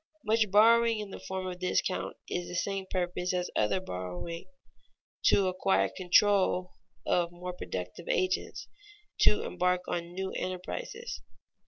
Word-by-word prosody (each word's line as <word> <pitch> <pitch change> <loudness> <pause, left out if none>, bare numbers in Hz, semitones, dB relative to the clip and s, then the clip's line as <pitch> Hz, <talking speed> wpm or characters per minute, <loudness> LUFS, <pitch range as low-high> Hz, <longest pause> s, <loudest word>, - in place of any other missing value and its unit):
Much 215 -1 +3
borrowing 230 +3 +6
in 210 -2 -5
the - - -7
form 190 0 -4
of 180 -1 -5
discount 185 0 -1
is 175 - -2
for - - -10
the 180 - -6
same 195 +2 -2
purpose 180 0 -1
as 180 0 -1
other 105 - +2
borrowing 90 - -5 0.8
to 195 -2 +5
acquire 185 +1 +2
control 185 0 +3 0.3
of 175 -1 +2
more 180 +1 -6
productive 90 - -6
agents, 185 0 0 0.5
to - - +4
embark 180 0 +1
on 170 0 -3
new 190 0 -3
enterprises. 185 - -5
185 Hz, 140 wpm, -30 LUFS, 175-195 Hz, 0.8 s, borrowing